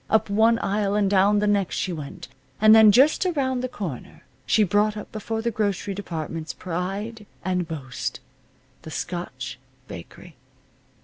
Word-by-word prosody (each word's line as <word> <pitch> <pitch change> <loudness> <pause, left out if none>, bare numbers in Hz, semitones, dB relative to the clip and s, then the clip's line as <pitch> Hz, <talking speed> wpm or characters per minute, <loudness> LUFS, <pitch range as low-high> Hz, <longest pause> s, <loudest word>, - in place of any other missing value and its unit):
Up 220 -2 +2
one 225 +3 +4
aisle, 200 0 0
and 205 -1 +2
down 200 +1 +4
the 210 - +2
next 200 -3 +1
she 185 - -2
went. 150 -4 -8 0.3
And 215 0 +7
then, 220 -1 +8
just 270 - +5
around 275 -8 0
the 255 - -1
corner, 180 - -7 0.2
she 215 - +4
brought 210 +2 +2
up 210 - -8
before 225 +1 -4
the 235 - 0
grocery 205 -2 -1
department's 165 -4 -5
pride 195 +5 -4 0.2
and 180 -2 0
boast, 140 -6 -5 0.6
the - - -10
Scotch 150 -7 -5 0.3
bakery. 85 - -11
205 Hz, 150 wpm, -24 LUFS, 175-220 Hz, 0.6 s, then